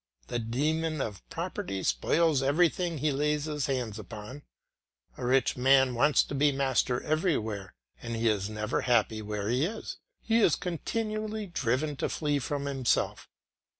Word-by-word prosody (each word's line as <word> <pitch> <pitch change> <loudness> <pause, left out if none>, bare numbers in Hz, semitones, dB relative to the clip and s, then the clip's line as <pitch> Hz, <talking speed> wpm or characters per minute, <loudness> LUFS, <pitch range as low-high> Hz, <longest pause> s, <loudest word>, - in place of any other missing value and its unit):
The 120 - -1
demon 155 +7 -1
of 105 -7 -4
property 95 -1 -4
spoils 145 - +2
everything 165 +4 +2
he 150 +2 +1
lays 150 +1 0 0.2
hands 120 -6 -2
upon. 110 +6 -8 0.7
A - - -8
rich 130 +1 +2
man 130 0 +4
wants 145 +5 +4
to - - -7
be 145 +1 +3
master 130 -2 +1
everywhere, 110 - -1 0.3
and 115 -1 -4
he 115 +1 0
is 105 -2 +1
never 110 0 -2
happy 115 -3 +2
where 105 -1 -3
he 125 +5 +1
is; 215 +7 -4 0.2
he 225 0 +2
is 175 - +4
continually 215 +4 -3
driven 145 - -1
to - - -1
flee 145 -2 0
from 140 +1 -3
himself. 135 -3 0
135 Hz, 150 wpm, -29 LUFS, 115-155 Hz, 0.7 s, man